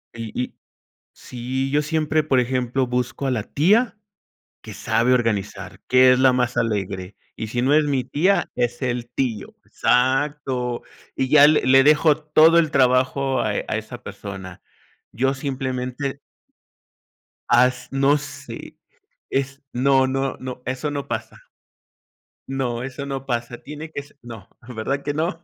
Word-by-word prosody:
Y 115 -1 -6
y - - -8 0.6
sí, 130 +2 -4
yo 150 +1 +3
siempre, 155 0 0
por 135 -4 +2
ejemplo, 125 +1 0
busco 125 +2 -2
a 135 - +1
la 110 -4 -1
tía 205 - +2 0.7
que - - -9
sabe 125 +2 +2
organizar, 115 -5 -2
que 130 0 +6
es 125 - +3
la 130 0 +5
más 125 -1 0
alegre, 100 -4 -2 0.2
y 110 - -4
si 120 +3 -2
no 135 - +2
es 150 0 +5
mi 135 -3 0
tía, 185 +7 +1
es 120 +1 -2
el 120 -2 -2
tío, 120 -6 -3
exacto, 130 -1 0 0.3
y 130 - 0
ya 145 -1 +8
le 155 0 +4
le 135 +1 +6
dejo 150 0 +5
todo 155 +2 +5
el 160 -3 +2
trabajo 130 0 +2
a 110 - 0
a 105 - -2
esa 120 +3 -9
persona, 95 -3 -8 0.5
yo 135 +4 +1
simplemente 130 0 -4 1.3
Has 125 +1 +3
no 135 +2 +3
sé. 140 -4 -9 0.5
Es 135 +1 -2
no, 130 +1 +3
no, 135 +1 -2
no, 130 -1 -7
eso 130 +4 -3
no 140 -1 -4
pasa. - - -6 1.1
No, 125 -3 -2
eso 135 +2 -6
no 135 -1 -5
pasa, 120 -1 -3
tiene 150 +2 -8
que 140 - -5
s 140 - -20
no, 115 -5 -11 0.2
¿verdad 125 +4 -3
que 145 - -2
no? 165 +2 -2
130 Hz, 150 wpm, -22 LUFS, 120-140 Hz, 1.3 s, ya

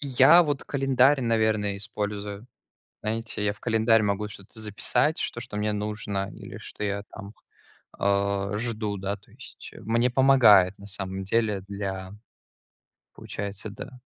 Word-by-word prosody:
Я, 140 +5 +6
вот, 145 -4 -2
календарь, 135 0 +3
наверное, 110 -4 +1
использую. 105 +1 -5 0.6
Знаете, 110 -1 -3
я 100 - +1
в 100 - -18
календарь 115 -1 +3
могу 105 0 -1
что-то 105 +1 -11
записать, 110 +8 +1
что 120 - -2
что 120 -4 -7
мне 105 0 0
нужно 105 -1 -3
или - - -10
что 105 - -6
я 100 0 -2
там, 100 +3 -9 0.6
а, 100 0 0
жду, 110 -3 -2
да, 100 +1 -3
то 100 - -25
есть, - - -11
мне 115 +4 +1
помогает, 115 -8 +6
на 100 - -11
самом 95 -1 -4
деле, 105 0 0
для 95 -2 -5 1.1
Получается, 100 +1 -5
да. 125 +5 -10
105 Hz, 140 wpm, -26 LUFS, 100-115 Hz, 1.1 s, Я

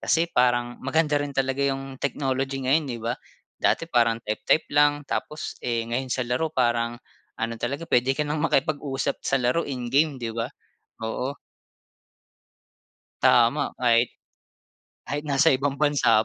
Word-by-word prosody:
Kasi 165 +1 +2
parang 120 -1 +1
maganda 150 +1 +1
rin 145 - -2
talaga 135 0 0
'yong 135 -1 -2
technology 135 -1 -1
ngayon, 145 +2 +2
'di 120 -2 -4
ba? 115 - 0 0.5
Dati - - +2
parang 115 -7 +2
type-type 110 +9 0
lang, 145 0 +3
tapos 150 +2 -4
eh, 115 -2 -1
ngayon 120 +3 -3
sa 130 0 -1
laro 125 +7 0
parang 120 -4 0 0.4
ano 115 +1 -2
talaga 140 +7 -3
puwede 130 -2 +2
ka 150 - 0
nang 150 +1 -2
makipag-usap 140 -3 0
sa 135 - +1
laro 125 +5 +1
in-game, 135 +3 +1
'di 115 -3 -4
ba? 115 +2 -2 0.6
Oo. 130 +5 -3 1.9
Tama. 125 +4 +4
Kahit 120 -1 +2 0.9
kahit 145 +1 -3
nasa 140 +3 +4
ibang 140 +1 -1
bansa 145 -7 +3
135 Hz, 140 wpm, -25 LUFS, 120-145 Hz, 1.9 s, Tama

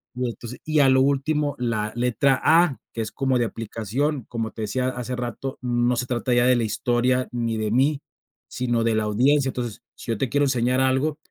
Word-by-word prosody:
Y 125 0 -1
entonces 115 +1 -8
y, 155 -1 +1
a 135 - +5
lo 130 0 +5
último, 145 +1 +1
la 110 -3 -1
letra 125 +2 +2
A 165 -3 +4 0.2
que 115 - -6
es 110 - -4
como 130 -2 +1
de 120 - +2
aplicación, 115 +5 -3
como 115 -2 -4
te 110 - -6
decía 125 +5 -1
hace 125 0 -4
rato: 125 +2 -5
"No 120 0 +1
se 125 - -1
trata 125 0 -1
ya 120 0 +4
de 125 -1 +4
la 115 - 0
historia 125 +3 0
ni 115 -2 -2
de 110 -1 -1
mí, 140 +4 +2 0.5
sino 120 -2 -1
de 115 -1 +1
la 110 - +1
audiencia". 135 +6 +2
Entonces, 120 -4 -5
si 115 - -6
yo 110 - -1
te 130 - 0
quiero 145 0 +2
enseñar 130 0 +1
algo, 130 +4 +1
125 Hz, 210 wpm, -24 LUFS, 115-135 Hz, 0.5 s, a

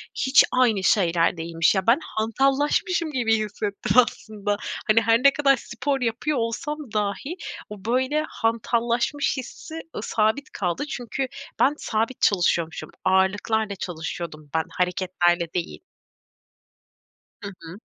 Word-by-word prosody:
hiç 265 +1 +5
aynı 235 -6 +3
şeyler 175 -3 +3
değilmiş. 165 +2 +1
Ya, 190 +1 -1
ben 235 +6 +5
hantallaşmışım 275 - 0
gibi 235 -5 +2
hissettim 210 +1 -2
aslında. 210 -4 +1 0.3
Hani, 220 +1 +5
her 225 0 +4
ne 280 0 +7
kadar 275 -2 +4
spor 260 +4 -3
yapıyor 250 +5 -1
olsam 235 +6 -2 0.2
dahi 210 - -2 0.3
o, 210 -2 -10
böyle, 260 +6 +1
hantallaşmış 235 +5 0
hissi, 260 +4 -8 0.2
ııı, - - -3
sabit 225 +7 0
kaldı. 175 +4 -2
Çünkü 245 +2 -3 0.3
ben 280 - +4
sabit 225 +1 -2
çalışıyormuşum. 175 -4 +1 0.2
Ağırlıklarla 205 +3 +1
çalışıyordum 165 -4 -6
ben, 160 - +2
hareketlerle 175 -2 0
değil. 175 -1 -3 1.6
Hı 205 - -6
hı. 165 +3 -10
220 Hz, 120 wpm, -24 LUFS, 190-255 Hz, 1.6 s, ne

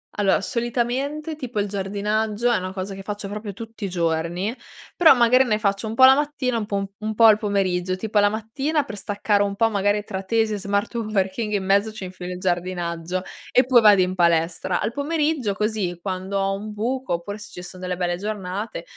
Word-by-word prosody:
Allora 200 -2 +2
solitamente, 260 +7 -2
tipo, 245 -7 -3
il 205 - -3
giardinaggio 210 +3 -1
è 235 - +3
una 185 0 -4
cosa 195 +1 -5
che 195 - -8
faccio 205 0 -5
proprio 210 0 -6
tutti 225 0 -7
i - - -3
giorni, 170 +3 -1 0.4
però 325 -5 +7
magari 250 +2 +5
ne 215 -4 +1
faccio 200 0 -1
un 220 - -4
po' 260 - +5
la 265 0 +9
mattina 285 -4 -1
un 220 - -2
po' 200 -1 -3
un 215 0 -4
po' 230 - +3
al 215 -2 +8
pomeriggio. 185 -4 0
Tipo 215 +3 -3
alla 205 0 +6
mattina 270 +9 -1
per 210 -7 -8
staccare 205 0 0
un 200 -1 0
po' 225 +2 +3
magari 205 0 +1
tra 190 -2 -5
tesi 225 +1 +1
e - - -3
smart 200 +3 -1
working 215 -1 -1
in 200 -2 0
mezzo 200 +3 +2
ci 215 - -8
infilo 180 -1 -6
il 180 - -7
giardinaggio 175 -1 -2 0.3
e 255 - +6
poi 255 -1 +6
vado 205 -3 +7
in 180 0 +1
palestra. 170 +1 +1
Al 215 - -1
pomeriggio, 290 -4 0
così, 205 -4 -2
quando 190 +1 -3
ho 195 0 0
un 210 +2 -7
buco, 250 +2 -2
oppure 185 +5 -4
se 210 - -10
ci 180 - -8
son 180 +1 -9
delle 180 0 -3
belle 175 -1 -1
giornate 205 +1 -4
205 Hz, 210 wpm, -23 LUFS, 190-225 Hz, 0.4 s, la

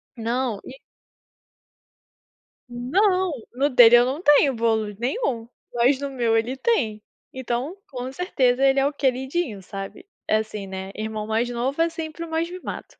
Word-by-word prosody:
Não, 235 -1 -2
e 265 - -11 1.9
Não, 365 - +1 0.2
no 280 +3 +2
dele 240 -1 +8
eu 240 0 +6
não 275 +6 -3
tenho 290 -4 +5
bolo 220 -2 0
nenhum, 245 - -2 0.2
mas 250 +3 +3
no 280 - -3
meu 235 -3 +1
ele 240 +4 -1
tem. 240 - 0 0.3
Então, 260 +5 -3
com 255 -1 -5
certeza 270 -6 +1
ele 270 0 +4
é 270 - +2
o 285 - 0
queridinho, 265 - -1
sabe. 195 - -8 0.2
É, 215 - +3
assim, 215 -2 -5
né, 190 0 -6
irmão 215 0 -4
mais 225 +3 0
novo 255 +6 -1
é 335 - +3
sempre 325 0 -6
o 330 - -11
mais 325 +1 -1
mimado. 365 0 -6
255 Hz, 155 wpm, -23 LUFS, 225-290 Hz, 1.9 s, dele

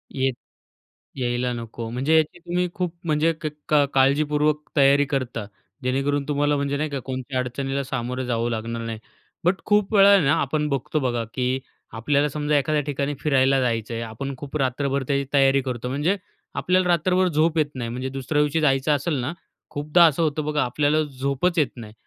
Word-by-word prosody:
येत 135 -1 +1 0.8
यायला 125 0 -1
नको. 115 -1 -6
म्हणजे 135 +7 +1
याची 160 +3 0
तुम्ही 180 +1 -1
खूप 180 -4 -2
म्हणजे 160 0 +2
क 155 - -2 0.2
का 145 -2 +5
काळजीपूर्वक 150 +2 +2
तयारी 140 0 +5
करता, 130 -5 -3 0.4
जेणेकरून 140 +2 0
तुम्हाला 145 0 +1
म्हणजे 140 0 -1
नाही 155 +1 -1
का 140 -1 -3
कोणत्या 130 0 -3
अडचणीला 135 +2 -2
सामोरं 125 0 -3
जावं 120 -1 -1
लागणार 115 +1 -3
नाही. 115 -1 -5 0.4
बट 180 +3 +3
खूप 210 0 +2
वेळा 200 0 +7
ना 140 -1 +3
आपण 150 +2 0
बघतो 140 +3 -1
बघा, 120 -3 -1
की 130 0 0 0.3
आपल्याला 140 +6 +1
समजा 150 +1 0
एखाद्या 150 +2 +1
ठिकाणी 140 0 -2
फिरायला 135 -2 +3
जायचं 115 -2 -1
आहे. 115 - -3
आपण 120 +5 -5
खूप 145 +2 -5
रात्रभर 135 0 0
त्याची 140 0 0
तयारी 135 -1 +4
करतो. 125 -1 -4
म्हणजे 150 +9 0 0.4
आपल्याला 185 0 +2
रात्रभर 180 +2 +3
झोप 160 0 +1
येत 155 - +4
नाही. 120 -3 -4
म्हणजे 130 +3 -4
दुसऱ्या 135 +3 -1
दिवशी 150 +2 +1
जायचं 135 0 +2
असेल 150 +3 -1
ना, 135 +6 -3 0.4
खूपदा 150 +4 +3
असं 165 0 +2
होतं 155 -1 -1
बघा 150 -1 +1
आपल्याला 145 +5 +1
झोपच 140 +5 -1
येत 150 - +3
नाही 110 -3 -10
140 Hz, 175 wpm, -23 LUFS, 130-150 Hz, 0.8 s, वेळा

